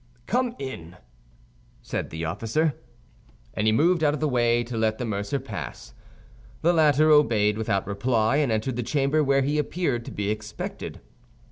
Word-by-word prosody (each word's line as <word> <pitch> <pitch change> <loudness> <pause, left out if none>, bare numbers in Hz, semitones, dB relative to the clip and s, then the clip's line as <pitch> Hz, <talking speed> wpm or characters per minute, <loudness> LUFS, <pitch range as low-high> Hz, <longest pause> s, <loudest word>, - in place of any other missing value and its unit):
"Come 245 0 0
in," 90 -11 -7 0.9
said - - -4
the 80 +1 -4
officer. 115 - 0 0.8
And 105 - 0
he - - +5
moved 165 +8 +3
out 150 -1 +3
of - - -6
the 155 - +1
way 120 -3 +2
to 120 0 -7
let 110 -1 +1
the 125 - -3
mercer 100 +5 -2
pass. 80 - -7 0.7
The 170 +2 +4
latter 155 -1 +4
obeyed 110 -8 +4
without 105 -3 -1
reply, 110 +4 +1
and 145 -5 +1
entered 110 +3 -1
the - - 0
chamber, 145 +4 +1
where 135 -1 +3
he 145 +3 0
appeared 145 -6 -1
to - - -7
be 100 0 -2
expected. 105 0 -6
125 Hz, 165 wpm, -25 LUFS, 110-150 Hz, 0.9 s, he